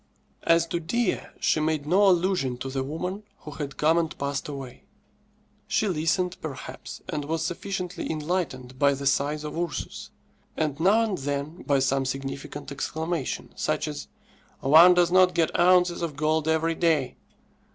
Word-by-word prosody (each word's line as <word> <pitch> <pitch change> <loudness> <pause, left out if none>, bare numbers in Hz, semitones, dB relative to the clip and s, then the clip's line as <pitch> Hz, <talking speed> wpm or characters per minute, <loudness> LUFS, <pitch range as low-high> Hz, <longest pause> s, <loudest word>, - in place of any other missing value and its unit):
As 165 0 +4
to 170 - -1
Dea, 230 +9 0 0.2
she - - +2
made 155 -1 0
no 190 +6 +4
allusion 175 -8 +1
to 130 +2 -5
the 135 0 -1
woman 180 +8 -4 0.2
who 150 - -9
had 140 -2 -6
come 160 +3 +3
and 165 -2 -3
passed 140 0 -3
away. 135 -4 -8 0.8
She 215 - +1
listened, 180 +1 0
perhaps, 140 -5 -8
and 150 - -3
was 160 +1 -1
sufficiently 180 0 -4
enlightened 150 -6 -3
by 140 -1 +4
the 140 +1 -6
sighs 145 +2 +1
of 150 - -5
Ursus, 170 -1 -4 0.5
and 155 -2 -1
now 200 +7 +4
and 210 -4 -2
then 145 +4 -3
by 140 -2 +1
some 135 0 +1
significant 135 +1 -5
exclamation, 160 +1 -3
such - - -1
as, - - -6 0.6
"_One 165 +6 +8
does 175 -1 +3
not 185 -1 +5
get 165 -1 +1
ounces 180 0 +4
of 165 -4 -3
gold 155 +1 0
every 160 +1 +2
day! 160 -5 +1
160 Hz, 160 wpm, -26 LUFS, 140-175 Hz, 0.8 s, One